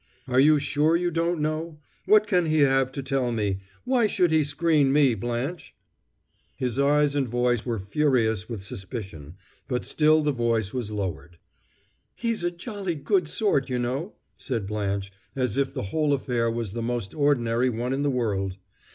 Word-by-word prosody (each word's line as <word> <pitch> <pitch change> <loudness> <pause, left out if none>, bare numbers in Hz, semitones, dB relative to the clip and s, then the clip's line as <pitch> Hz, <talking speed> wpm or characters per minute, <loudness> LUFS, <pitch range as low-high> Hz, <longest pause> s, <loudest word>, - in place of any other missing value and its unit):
"Are 125 0 +2
you 150 +3 +6
sure 150 +3 +2
you 175 0 0
don't 170 +1 0
know? 155 +1 -2 0.3
What 215 0 +6
can 180 -5 +2
he 155 -1 +2
have 135 -1 +3
to 140 - -4
tell 130 -2 0
me? 105 -4 -1 0.3
Why 245 -3 +3
should 180 -4 +2
he 160 -1 +4
screen 145 -1 +2
me, 140 -3 +4
Blanche?" 120 - -4 0.8
His 125 0 -2
eyes 145 +1 +3
and 140 -4 0
voice 120 0 0
were 115 -2 -1
furious 110 -1 0
with 110 -5 -5
suspicion, 95 - -8 0.3
but 125 -2 -2
still 155 0 +3
the 150 - +2
voice 115 -5 0
was 125 -5 -3
lowered. 85 -6 -5 0.8
"He's 230 -5 -2
a 175 - +2
jolly 190 0 -5
good 160 +4 +1
sort, 155 - 0
you 125 - -1
know," 130 - -3 0.2
said 115 -7 -3
Blanche, 100 -1 -2 0.2
as 125 -5 -1
if 140 0 0
the - - -4
whole 150 -2 +2
affair 120 -4 0
was 115 -4 -3
the 115 - -3
most 115 -4 -3
ordinary 125 -4 +2
one 120 +2 -2
in 135 - -1
the 145 - +1
world. 100 -7 -1
130 Hz, 175 wpm, -25 LUFS, 115-155 Hz, 0.8 s, you